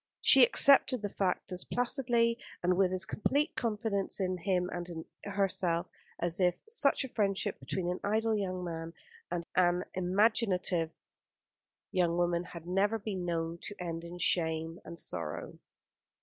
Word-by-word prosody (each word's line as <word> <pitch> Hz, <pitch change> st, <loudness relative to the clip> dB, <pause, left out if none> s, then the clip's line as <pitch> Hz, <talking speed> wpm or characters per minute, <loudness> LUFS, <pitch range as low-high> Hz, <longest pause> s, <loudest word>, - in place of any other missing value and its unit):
She -, -, +7 dB
accepted 275 Hz, -, +5 dB
the 205 Hz, -, -2 dB
fact 185 Hz, -2 st, -1 dB
as 180 Hz, 0 st, -2 dB
placidly, 240 Hz, -2 st, +1 dB, 0.2 s
and 180 Hz, +1 st, +3 dB
with 185 Hz, 0 st, +3 dB
as 185 Hz, 0 st, +1 dB
complete 285 Hz, -, 0 dB
confidence 210 Hz, -4 st, -1 dB
in 185 Hz, -1 st, -1 dB
him 180 Hz, 0 st, 0 dB
and 175 Hz, 0 st, -5 dB
in 160 Hz, -2 st, -7 dB, 0.2 s
herself, 190 Hz, -4 st, 0 dB, 0.3 s
as 170 Hz, +1 st, -1 dB
if 180 Hz, -1 st, +3 dB
such 445 Hz, -12 st, +1 dB
a -, -, -4 dB
friendship 200 Hz, -5 st, -1 dB
between 185 Hz, -2 st, -3 dB
an 180 Hz, +1 st, -2 dB
idle 220 Hz, +2 st, +1 dB
young 185 Hz, -3 st, -2 dB
man 165 Hz, -1 st, -5 dB, 0.3 s
and 170 Hz, -1 st, -3 dB
an 180 Hz, 0 st, +3 dB
imaginative 185 Hz, -2 st, +2 dB, 1.0 s
young 175 Hz, -3 st, +1 dB
woman 175 Hz, 0 st, +1 dB
had 170 Hz, -2 st, -10 dB
never 195 Hz, +5 st, +1 dB
been 195 Hz, -4 st, -4 dB
known 165 Hz, -1 st, -2 dB
to 205 Hz, -, -5 dB
end 165 Hz, -2 st, -4 dB
in 170 Hz, +1 st, -8 dB
shame 160 Hz, -1 st, 0 dB
and 170 Hz, -, -9 dB
sorrow. 85 Hz, -, -4 dB
185 Hz, 150 wpm, -31 LUFS, 175-210 Hz, 1.0 s, She